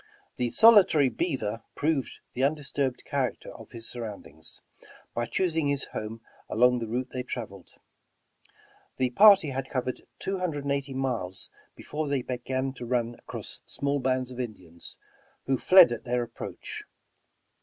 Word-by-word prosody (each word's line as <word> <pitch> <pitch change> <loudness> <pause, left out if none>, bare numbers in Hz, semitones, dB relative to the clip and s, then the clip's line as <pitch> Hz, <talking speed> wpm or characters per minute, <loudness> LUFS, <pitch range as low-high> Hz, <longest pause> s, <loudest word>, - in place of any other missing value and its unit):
The 125 -1 0
solitary 200 - +7
beaver 115 -4 -2
proved 150 -3 -1
the 130 - -1
undisturbed 140 -2 0
charac - - -1
ter - - -9
of - - -12
his 115 -1 -4
surroundings, 105 -10 -7 0.5
by 120 0 -1
choosing 165 0 0
his 140 -1 +1
home 110 +1 -5 0.3
along 125 +2 +4
the 115 - -4
route 125 +3 -3
they 130 - -3
traveled. 110 -7 -7 1.2
The 130 -1 +1
party 195 - +7
had 135 0 -4
covered 130 -2 -2 0.2
two 195 0 -3
hun 180 -1 0
dred 145 -2 -4
and 140 - -1
eighty 140 -1 -2
miles 120 -9 -2 0.2
before 155 0 -4
they 140 -3 0
began 130 +2 -2
to 120 - -6
run 120 -1 0
across - - -5
small 140 0 -1
bands 130 -1 0
of 125 - -8
Indians, 90 -9 -7 0.5
who 135 -2 +1
fled 185 -9 +8
at 120 - -4
their 125 0 0
approach. 120 0 -7
130 Hz, 155 wpm, -28 LUFS, 120-140 Hz, 1.2 s, fled